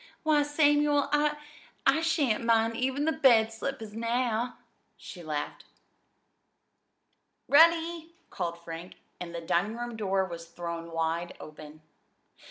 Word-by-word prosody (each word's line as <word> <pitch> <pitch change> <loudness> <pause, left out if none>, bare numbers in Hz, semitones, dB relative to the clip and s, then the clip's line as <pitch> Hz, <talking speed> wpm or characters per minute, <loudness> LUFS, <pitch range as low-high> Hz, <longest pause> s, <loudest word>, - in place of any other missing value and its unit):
Why, 305 -2 +3
Samuel, 290 -1 +2
I 295 0 +2 0.5
I 320 - +4
shan't 300 -10 +1
mind 225 0 +2
even 265 +4 -1
the 320 - +2
bed 235 -8 +4
slippers 225 -2 -5
now," 235 +1 -1 0.4
she 180 - -10
laughed. 150 -3 -5 1.8
"Ready!" 330 +2 +4 0.2
called 170 -2 -3
Frank, 165 +1 -8 0.2
and 170 -1 -7
the 170 - -4
dining 180 +7 0
room 240 -1 -5
door 195 -3 0
was 170 -2 -8
thrown 170 0 -6
wide 165 +1 -2
open. 155 0 -12
225 Hz, 120 wpm, -29 LUFS, -, 1.8 s, I